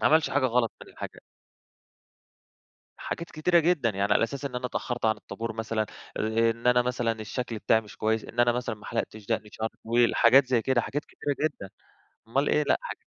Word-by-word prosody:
ماعملش 160 0 +4
حاجة 140 -2 +2
غلط 120 -1 +1
من - - -16
الحاجة - - -8 1.8
حاجات 170 - -5
كتيرة 170 +3 +3
جدًا، 155 -8 +2
يعني 100 0 +1
على - - +3
أساس 140 +4 -3
إن 125 - -4
أنا 125 0 -2
اتأخرت 120 -1 -3
عن 110 0 +3
الطابور 110 +2 -6
مثلًا، 110 0 -2 0.4
أ 115 +1 +2
إن 115 +2 -4
أنا 125 0 +5
مثلًا 120 -1 0
الشكل 115 +2 -4
بتاعي 110 +1 +3
مش 105 - -14
كويس، 110 0 0
إن 120 - -8
أنا 120 0 +5
مثلًا 120 -2 -2
ما 105 - -14
حَلَقتش 110 -1 -4
دَقني 110 -1 -2
شعري 110 0 -3
طويل، 120 +1 +3
حاجات 130 +3 +6
زي 125 -3 +2
كده 125 0 +2
حاجات 145 +5 -4
كتيرة 145 -1 -3
جدًا، 100 -10 -11 0.6
أُمّال 135 +5 +1
إيه، 150 - +3
لأ - - +3
حاج - - -6
120 Hz, 195 wpm, -27 LUFS, 110-130 Hz, 1.8 s, حاجات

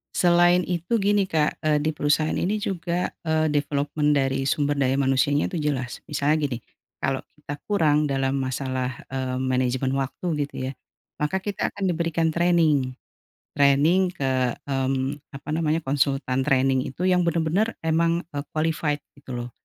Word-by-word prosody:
selain 175 0 +5
itu 175 +4 -2
gini 200 0 +2
Kak, 155 -2 +1
eee, 155 -1 +3
di 155 - +1
perusahaan 150 +2 +1
ini 200 +4 0
juga, 180 -3 -2 0.2
eee, 155 0 +2
development 145 +1 0
dari 135 -1 +1
sumber 145 -1 +1
daya 135 0 +2
manusianya 135 +2 +2
tu 175 - -2
jelas. 135 -4 -2
Misalnya 150 +1 +2
gini. 120 -3 -4 0.4
Kalo 135 -1 -1
kita 145 -1 -7
kurang 155 -7 +2
dalam 135 0 0
masalah, 130 -1 -2 0.2
eee, 130 -1 -3
manajemen 130 +1 0
waktu 135 +6 -3 0.2
gitu 140 - -9
ya, - - -3 0.4
maka 150 +6 -1
kita 200 +1 -2
akan 200 - -6
diberikan 165 -1 0
training. 165 -7 +3 0.6
Training 145 +7 +4
ke, 130 -5 0
mmm, 135 +1 -1 0.2
apa 135 +2 -10
namanya, 160 0 0
konsultan 135 -1 0
training 135 -1 +3
itu 150 - -6
yang 180 -1 +4
bener-bener 170 +7 +1
emang, 165 +2 +2
eee, 145 - -2 0.2
qualified 155 -2 0 0.2
gitu 130 -3 -7
loh. 120 0 -5
145 Hz, 150 wpm, -24 LUFS, 135-165 Hz, 0.6 s, selain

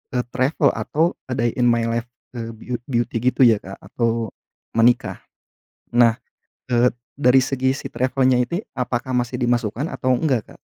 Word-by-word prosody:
eee, 125 - +1
travel 135 +3 +2
atau 165 +4 +1 0.2
a 130 - -3
day 120 0 +1
in 120 - +4
my 115 -1 +3
life 115 +1 -2 0.3
eee, 115 0 -5
byut 120 +2 -5
beauty, 120 -2 -1 0.2
gitu - - -1
ya 115 -3 +5
Kak 95 +1 -9
atau 115 -2 -1 0.5
menikah. 120 +2 +3 0.8
Nah, 120 -2 +5 0.5
eee, 120 +1 +4 0.2
dari 130 -2 +5
segi 130 0 0
si - - -6
travel-nya. 130 0 +2
ini 170 +9 -3 0.2
apakah 125 0 -2
masih 125 0 -1
dimasukkan 120 +3 0
atau 130 - -1
enggak 130 -7 -1
Kak? - - -19
125 Hz, 160 wpm, -21 LUFS, 115-130 Hz, 0.8 s, ya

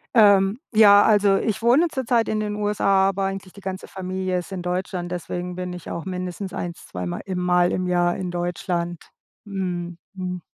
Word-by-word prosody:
Ähm, 200 -1 +5
ja, 205 -2 +8
also 205 -2 +4
ich 220 +1 -1
wohne 250 +9 +4
zurzeit 245 -6 0
in 215 - 0
den 210 -1 -2
USA, 195 -2 +2
aber 195 0 -1
eigentlich 195 -1 -5
die 200 - -13
ganze 190 0 -5
Familie 185 -1 -3
ist 175 - -9
in 185 -2 -5
Deutschland, 180 0 -3
deswegen 180 0 -4
bin 180 0 -4
ich 180 -2 -8
auch 170 - -4
mindestens 185 +1 -4
eins, 175 -3 -6
zweimal, 90 -1 -4
im 190 -2 -3
Mal 180 0 +3
im 185 - -1
Jahr 175 -1 +1
in 185 -2 -4
Deutschland. 175 -1 -3 0.4
Mhm, 180 -4 -4 0.2
mhm. 180 -1 -4
185 Hz, 180 wpm, -23 LUFS, 180-200 Hz, 0.4 s, ja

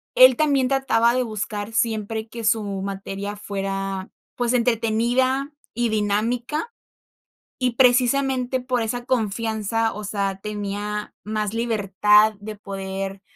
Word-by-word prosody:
él 255 0 +8
también 280 -2 +2
trataba 245 -3 +3
de 255 0 +1
buscar 215 -1 -4
siempre 220 -1 -1
que 230 0 -8
su 220 0 +3 0.2
materia 195 +1 -5
fuera, 195 -1 -3 0.3
pues, 240 -1 0
entretenida 245 +4 +1 0.2
y 240 +1 0
dinámica, 230 - -1 0.9
y, 250 - +3
precisamente, 255 +1 +3
por 250 -1 -1
esa 240 +2 -3
confianza, 225 -1 0
o 210 - -7
sea, 200 -2 -2
tenía 210 0 -4
más 215 -1 -2
libertad 210 -2 +3
de 215 +1 -7
poder, 195 -1 -5
220 Hz, 115 wpm, -23 LUFS, 205-245 Hz, 0.9 s, él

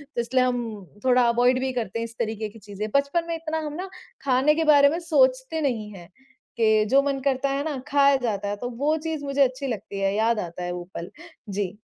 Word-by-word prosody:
तो 235 - +1
इसलिए 255 +2 +1
हम 235 -6 -2 0.2
थोड़ा 250 -1 +5
अवॉइड 245 +2 +3
भी 260 0 -1
करते 230 -2 -3
हैं - - -2
इस 230 0 -11
तरीक़े 220 -1 -2
की 225 - -15
चीज़ें। 205 +1 -6
बचपन 280 +5 +2
में 335 - -2
इतना 320 -1 -3
हम 295 - -5
ना 370 +4 -5 0.3
खाने 275 +3 +3
के 325 - +1
बारे 285 -2 +7
में 330 +3 -2
सोचते 270 -1 +2
नहीं 230 -7 -1
हैं, 175 -3 -12 0.5
कि 215 -1 +4
जो 275 +3 +5
मन 275 -1 -1
करता 275 0 +1
है 275 +1 -1
ना 295 -4 -2
खाया 280 -1 +4
जाता 215 -6 -2
है, 205 - -2
तो 245 +4 -5
वो 285 +6 0
चीज़ 315 -3 -3
मुझे 280 0 0
अच्छी 265 +1 +1
लगती 205 -4 -5
है, 195 0 +1
याद 225 +1 +2
आता 175 -1 -5
है 175 - -3
वो 175 0 -5
पल। 170 - -6 0.4
जी। 195 -2 -2
255 Hz, 230 wpm, -25 LUFS, 215-280 Hz, 0.5 s, बारे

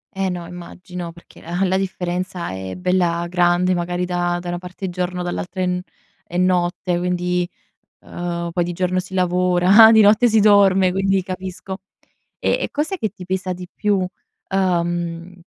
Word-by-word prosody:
Eh 190 0 0
no, 175 -1 -4
immagino. 180 0 -8
Perché 170 +1 -17
ah, 175 +4 -1
la 190 0 +1
differenza 185 - -3
è 95 0 -6
bella 180 -2 +1
grande, 175 +1 +2
magari 175 0 -1
da 175 -1 -1
da 175 0 -6
una 175 0 -3
parte 180 +2 -8
è - - -2
giorno 180 0 -3
dall'altra 180 +1 -4
è - - +2
n 180 0 -1 0.4
è 175 - -5
notte, 180 0 +1
quindi, 180 0 -1 0.5
uhm, 170 -1 -4
poi 175 0 +1
di 175 - -3
giorno 180 +1 0
si 185 +1 -5
lavora, 180 +4 +5
di 220 - +7
notte 215 +3 +6
si 220 -1 +4
dorme, 195 -3 +5
quindi 195 +1 +1
capisco. 185 0 -6 0.6
E - - +1
e - - -1
cos'è 310 +7 -2
che 220 - -2
ti 180 0 -11
pesa 185 0 -2
di 180 0 -8
più, 210 -1 +1
uhm, 175 -2 -3
180 Hz, 170 wpm, -20 LUFS, 175-190 Hz, 0.6 s, di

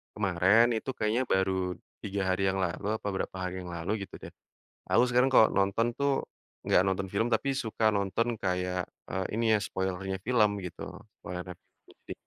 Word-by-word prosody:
kemarin 100 +3 +4
itu 130 - -8
kayaknya 110 +4 +1
baru 95 -1 +1 0.3
3 100 -1 -2
hari 95 +1 +1
yang 95 - +1
lalu 90 +3 -3
apa - - -29
berapa 95 - -3
hari 90 0 -3
yang 90 - -8
lalu 85 +3 -3 0.2
gitu - - -12
deh, - - -8 0.6
aku 120 - +5
sekarang 125 +2 +4
kalau 110 - +8
nonton 100 +4 +2
tuh 140 -1 +1 0.4
enggak 90 - +4
nonton 95 0 0
film 115 +4 +2
tapi 120 +4 +1
suka 110 -4 +1
nonton 100 +3 0 0.2
kayak 90 0 -1 0.2
eee, 95 +1 -1
ini 115 - 0
ya 105 - +4
spoiler-nya 95 0 -3
film 115 -3 +4
gitu 90 - -7 0.4
spoiler-nya 90 0 -6
film - - -49
jadi - - -10
95 Hz, 175 wpm, -29 LUFS, 90-115 Hz, 0.6 s, kalau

